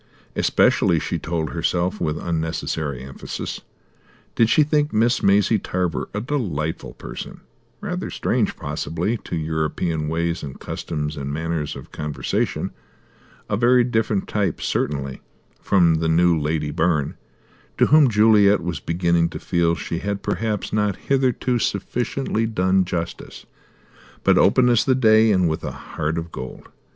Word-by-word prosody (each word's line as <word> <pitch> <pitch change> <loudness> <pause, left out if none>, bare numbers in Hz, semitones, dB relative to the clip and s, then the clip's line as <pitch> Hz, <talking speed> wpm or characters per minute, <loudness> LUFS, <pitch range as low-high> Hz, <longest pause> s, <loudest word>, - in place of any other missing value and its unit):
Especially, - - +3
she - - -2
told 80 -2 -2
herself 90 +4 -1
with 75 0 0
unnecessary 80 -5 -3
emphasis, 65 0 -6 0.7
did 115 -1 +3
she 150 +7 +5
think 150 0 +1
Miss 115 +3 +2
Maisie 100 +2 +3
Tarver 90 -3 -2
a 105 - -3
delightful 95 - -3
person; - - -8 0.4
rather - - -3
strange, - - 0
possibly, 90 +8 -2
to 90 - -6
European 80 0 -1
ways 85 +2 -1
and 70 -3 -8
customs 75 -1 -4
and 70 0 -4
manner 80 +2 -2
of - - -11
conversation, 75 -2 -2 0.8
a 105 - 0
very 120 +3 +4
different 110 -4 0
type, 105 -2 -1
certainly, 70 -2 -2 0.4
from 85 -4 +4
the 80 0 0
new 85 +1 +4
Lady 75 -1 -1
Byrne 80 -2 0 0.6
to - - +5
whom 150 -3 +6
Juliet 105 -2 +5
was 85 -4 -3
beginning 85 0 +1
to - - -7
feel 85 -2 +1
she 85 - -4
had 100 -1 -3
perhaps 110 -3 -2
not 105 -2 +1
hitherto 130 -2 0
sufficiently 115 +3 -1
done 95 -3 +2
justice 85 -1 -5 0.8
but - - +4
open 125 -1 +5
as 120 -2 +4
the 130 - +2
day, 110 -3 +5
and 95 -3 +3
with 80 -1 -2
a - - -3
heart 80 +2 -4
of 85 0 -4
gold. 65 0 -8
90 Hz, 140 wpm, -22 LUFS, 80-110 Hz, 0.8 s, whom